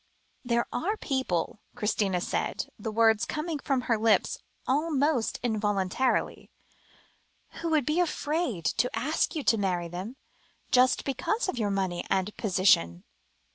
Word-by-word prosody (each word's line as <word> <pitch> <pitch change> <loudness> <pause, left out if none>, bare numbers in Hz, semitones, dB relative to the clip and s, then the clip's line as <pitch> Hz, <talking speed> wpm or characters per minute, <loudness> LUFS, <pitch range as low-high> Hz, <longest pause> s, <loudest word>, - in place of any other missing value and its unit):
"There 235 -1 +1
are 360 +12 0
some - - -7
people," 240 - -1 0.2
Christina 200 -3 0
said, - - -2
the 220 - -4
words 225 0 +4
coming 305 +4 -3
from 270 -2 0
her 230 -3 0
lips 225 0 +2 0.3
almost 290 -3 +1
involuntarily 210 +1 0 1.1
"who 335 - -1
would 310 -5 +2
be 305 +5 +1
afraid 300 - -1
to 225 +11 +1
ask 310 +4 0
you 305 - -2
to 225 - +3
marry 180 -3 0
them, 185 +8 -6 0.6
just 255 0 +4
because 390 - -1
of 255 - -2
your 210 -2 0
money 190 -3 -1
and 195 +2 0
position." 185 - +2
230 Hz, 135 wpm, -28 LUFS, 195-285 Hz, 1.1 s, words